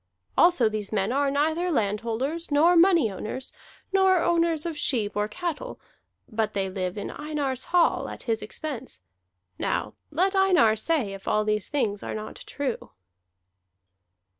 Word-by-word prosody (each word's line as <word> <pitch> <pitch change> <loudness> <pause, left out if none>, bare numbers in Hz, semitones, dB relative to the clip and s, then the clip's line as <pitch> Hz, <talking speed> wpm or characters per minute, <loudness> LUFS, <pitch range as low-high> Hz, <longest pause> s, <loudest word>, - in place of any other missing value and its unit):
Also 345 -10 +5
these 215 -2 -3
men 205 0 0
are 280 +2 +2
neither 315 +5 +1
landholders, 235 - -1
nor 315 +5 +5
money 335 - +5
owners, 220 +7 -6 0.4
nor 380 -1 +5
owners 335 -2 +1
of 335 -2 -3
sheep 225 -8 -1
or 210 0 0
cattle; 355 - -5 0.5
but 215 -2 -2
they 195 -1 0
live 185 0 -3
in 205 - -4
Einar's 290 -4 -3
hall 350 -1 +2
at - - -8
his 225 -2 -1
expense. 260 - -6 0.6
Now 105 - -1 0.2
let 370 +6 +1
Einar 365 - +5
say 235 -3 0
if 195 0 -10
all 215 0 +2
these 210 -1 0
things 225 -9 -1
are - - -5
not 215 0 -7
true." 275 -4 -4
270 Hz, 145 wpm, -26 LUFS, 215-335 Hz, 0.6 s, Also